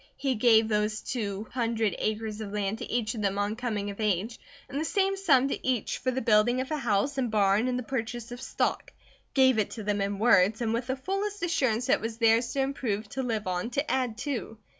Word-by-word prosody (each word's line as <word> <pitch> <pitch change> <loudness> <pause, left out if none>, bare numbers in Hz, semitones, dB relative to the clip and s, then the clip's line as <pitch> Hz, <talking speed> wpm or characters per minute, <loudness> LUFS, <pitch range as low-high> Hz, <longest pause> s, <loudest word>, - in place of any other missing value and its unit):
He 270 -2 0
gave 225 -1 +4
those 210 0 0
two 210 -3 -4
hundred 230 -4 0
acres 215 0 -2
of 205 -2 -6
land 205 +1 -2
to - - -6
each 225 -2 0
of 225 - -5
them 200 -1 0
on 205 +1 0
coming 215 -4 -3
of 200 - -11
age, 210 +2 -1 0.3
and 280 +2 -3
the - - 0
same 390 +3 +1
sum 280 -9 +3
to - - -4
each 250 -5 0
for 255 - -1
the 255 0 -1
building 225 +3 +4
of 260 +3 -3
a 305 - 0
house 255 +2 0
and 250 -3 0
barn 210 +2 +3
and 250 -1 0
the 250 - -3
purchase 240 -1 -4
of 245 +1 -7
stock; - - -2 0.4
gave 260 -4 +5
it 210 - +1
to 220 - -7
them 205 0 0
in 200 0 -1
words, 215 -2 +4
and 230 -2 0
with 235 +2 -2
the 260 - 0
fullest 390 +7 -3
assurance 255 -9 +1
that - - +3
it - - -15
was 225 0 -4
theirs 230 +1 +3
to 275 - +1
improve, 225 -6 -2
to 265 - -3
live 225 -4 -2
on, 180 +4 -2
to 280 +5 -1
add 250 -4 0
to. 235 - -4
230 Hz, 235 wpm, -28 LUFS, 210-260 Hz, 0.4 s, gave